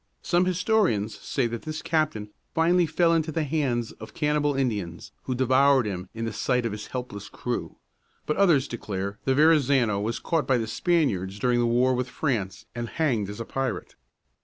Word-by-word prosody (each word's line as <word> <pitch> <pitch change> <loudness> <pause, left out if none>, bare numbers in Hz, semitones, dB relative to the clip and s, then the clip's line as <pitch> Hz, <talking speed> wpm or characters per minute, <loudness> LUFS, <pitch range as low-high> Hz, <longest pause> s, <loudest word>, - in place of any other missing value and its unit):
Some 175 +1 +2
historians 180 - +1
say 135 - -1
that 115 -1 -3
this 155 0 -5
captain 150 -10 -1 0.2
finally 170 +1 +3
fell 165 +2 +3
into 160 -1 +1
the 160 +1 -1
hands 135 -6 -1
of 110 0 -12
cannibal 150 -1 +1
Indians, 105 -10 -2
who 130 - -1
devoured 130 0 +4
him 90 -3 -4
in 115 0 -3
the 115 - -3
sight 125 +1 0
of 115 - -1
his 105 0 -6
helpless 125 -6 -6
crew; - - -4 0.5
but 150 - 0
others 165 -9 +4
declare 100 -3 -4
that 135 - +2
Verrazano 140 -8 +4
was 115 +3 -2
caught 160 -6 -1
by 130 - +3
the 115 - -1
Spaniards 110 - 0
during 120 +2 +2
a 120 - +2
war 125 +2 +3
with 125 0 -2
France, 105 -9 -2
and 120 -1 -4
hanged 120 -11 0
as 105 - -7
a 115 - -4
pirate. 130 -7 -3
125 Hz, 185 wpm, -26 LUFS, 110-155 Hz, 0.5 s, devoured